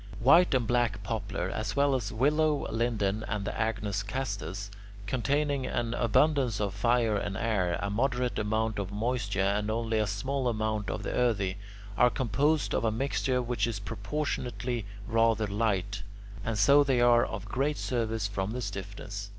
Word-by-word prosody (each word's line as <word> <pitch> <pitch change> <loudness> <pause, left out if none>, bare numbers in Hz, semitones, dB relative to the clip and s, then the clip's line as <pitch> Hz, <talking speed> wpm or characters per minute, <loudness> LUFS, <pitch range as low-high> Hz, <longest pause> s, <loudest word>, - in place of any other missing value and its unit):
White 155 +6 +6
and 125 -2 +2
black 115 -3 +1
poplar, 95 -3 -3
as 110 +3 -3
well 140 0 +3
as 120 -6 -1
willow, 150 +5 +2
linden, 110 -3 0
and 100 -1 -2
the - - -3
agnus 110 -3 -1
castus, 100 -3 -4 0.3
containing 140 +4 0
an 120 -2 -1
abundance 125 0 +2
of 100 -2 -1
fire 115 +1 +2
and 100 -1 -3
air, 100 -6 0
a 100 - -2
moderate 125 +2 0
amount 110 0 0
of 100 -1 -4
moisture, 105 -2 -1
and 105 +2 0
only 115 0 0
a 105 - +1
small 130 +7 -2
amount 110 -2 -1
of - - -3
the - - -3
earthy, 105 -6 +1 0.4
are 125 - +7
composed 145 +6 +1
of - - 0
a 110 - +2
mixture 130 +1 0
which 120 -3 0
is 115 -4 -2
proportionately 120 +1 -3 0.2
rather 115 -1 +2
light, 100 -1 -1 0.4
and 110 -1 -2
so 140 +8 +6
they 135 -3 +2
are 120 -1 +5
of 100 -4 -5
great 135 +8 -1
service 115 -4 -1
from 95 -1 -3
their 125 - -3
stiffness. 100 -1 -6
110 Hz, 165 wpm, -29 LUFS, 100-125 Hz, 0.4 s, are